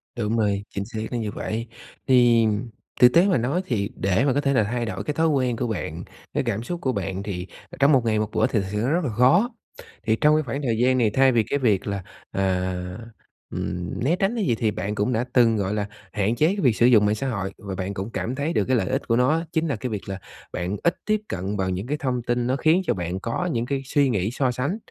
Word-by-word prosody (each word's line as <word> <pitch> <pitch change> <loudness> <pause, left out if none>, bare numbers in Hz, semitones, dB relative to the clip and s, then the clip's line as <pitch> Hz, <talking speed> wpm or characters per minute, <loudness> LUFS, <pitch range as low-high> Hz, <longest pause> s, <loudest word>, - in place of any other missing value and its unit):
Đúng 115 -1 -1
rồi, 100 -2 +1
chính 100 - -4
xác 110 0 -6
là 120 - -1
như 110 -3 -3
vậy. 115 +3 -4 0.4
Thì 120 -3 +5 0.6
thực 125 0 +8
tế 175 +4 +6
mà 185 - +3
nói 135 +10 0
thì 105 - -1
để 95 +6 +1
mà 135 - +3
có 145 - +1
thể 140 -1 +1
là 115 -5 +4
thay 120 +3 -2
đổi 110 - -4
cái 150 - -2
thói 165 +2 +2
quen 130 -5 +1
của 125 - -1
bạn, 85 -6 -4 0.3
cái - - 0
cảm 115 -3 -2
xúc 175 +6 -5
của 130 - +1
bạn 100 -3 -3
thì, 95 -3 -5 0.2
ờ, - - -10
trong 140 +2 +5
một 130 -5 +4
ngày 110 -1 +2
một 105 0 -2
bữa - - +2
thì 110 - 0
thực - - -5
sự 105 - -2
nó 120 +6 0
rất 170 +2 +1
là 140 - -1
khó. 160 - +4 0.5
Thì 110 - +2
trong 150 0 +5
cái 155 - +2
khoảng 135 +2 -4
thời 115 -5 0
gian 130 +2 +3
này 115 -4 +3
thay 135 0 +5
vì 115 -3 +3
cái 140 - -1
việc 105 -7 +1
là, 100 -1 -3 0.3
à, 95 -1 0 0.8
ừm, 90 +4 -4
né 155 +7 +3
tránh 195 +5 0
cái 220 -4 0
gì 120 - +2
thì 110 -1 0
bạn 100 +2 -3
cũng 105 +4 0
đã 115 +2 0
từng, 115 -3 +5
gọi 100 0 -1
là, 105 -1 -1 0.2
hạn 105 +3 0
chế 150 - +3
cái 200 +4 0
việc 125 -6 +3
sử 120 - +3
dụng 115 -4 +6
mạng 105 +1 +2
xã 135 +5 -3
hội 100 -5 -3
và 100 -2 -6
bạn 95 +1 -3
cũng 100 +2 -4
cảm 120 +2 -3
thấy 145 +5 -1
được - - +1
cái 130 - +2
lợi 95 - 0
ích - - -2
của 115 - +2
nó 125 +2 +3
á, 165 +2 +1
chính 165 0 0
là 140 - 0
cái 125 +4 -4
việc 105 -3 -5
là 95 -1 -4 0.3
bạn 90 +3 -3
ít 170 - +3
tiếp 215 -1 +1
cận 95 +3 -3
vào 95 -1 0
những 95 +5 -3
cái 150 - -1
thông 130 -4 -1
tin 120 0 0
nó 130 - +1
khiến 160 +6 +3
cho - - +2
bạn 90 0 -3
có 115 - -2
những 120 -4 -1
cái 135 +1 -2
suy 140 0 +2
nghĩ 105 -2 0
so 130 0 0
sánh. 140 - -2
120 Hz, 275 wpm, -24 LUFS, 100-135 Hz, 0.8 s, thực